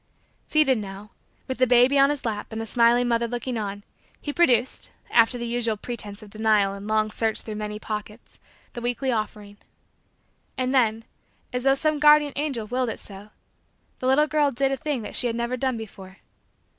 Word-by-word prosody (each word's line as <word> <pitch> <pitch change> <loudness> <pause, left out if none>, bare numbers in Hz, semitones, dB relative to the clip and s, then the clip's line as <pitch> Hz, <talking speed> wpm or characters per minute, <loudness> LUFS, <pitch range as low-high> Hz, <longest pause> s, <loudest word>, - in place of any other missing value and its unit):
Seated 280 -6 +3
now, 200 +1 -8 0.4
with 260 -1 -4
the 255 - +4
baby 250 +3 +5
on 275 0 +6
his 290 -3 -3
lap 210 -2 -3
and 220 - -4
the 225 - -3
smiling 240 +1 +3
mother 235 0 +1
looking 245 +1 -4
on, 205 -2 -4 0.4
he 290 - -5
produced, 255 -8 +2 0.2
after 230 +1 +4
the 235 - -4
usual 235 -2 -1
pretense 210 -2 -7
of 205 - -14
denial 215 -2 +2
and 200 +1 -8
long 215 0 +1
search 220 0 -1
through 220 - -7
many 210 0 -4
pockets, 210 +1 -7 0.3
the 240 - -6
weekly 245 +2 -1
offering. 210 -2 -4 1.0
And 255 0 0
then, 225 -4 +2 0.5
as 250 +1 -2
though 270 0 +5
some 305 +1 0
guardian 295 -1 +6
angel 275 -6 -2
willed 250 +2 -1
it - - -5
so, 200 +1 -9 0.7
the 255 - -2
little 275 +3 +5
girl 300 -1 +2
did 270 +1 0
a - - +1
thing 290 -5 -3
that - - -7
she 245 - +2
had 230 - -2
never 235 +1 -1
done 255 -1 -1
before. 195 -3 -10
235 Hz, 190 wpm, -25 LUFS, 215-260 Hz, 1.0 s, on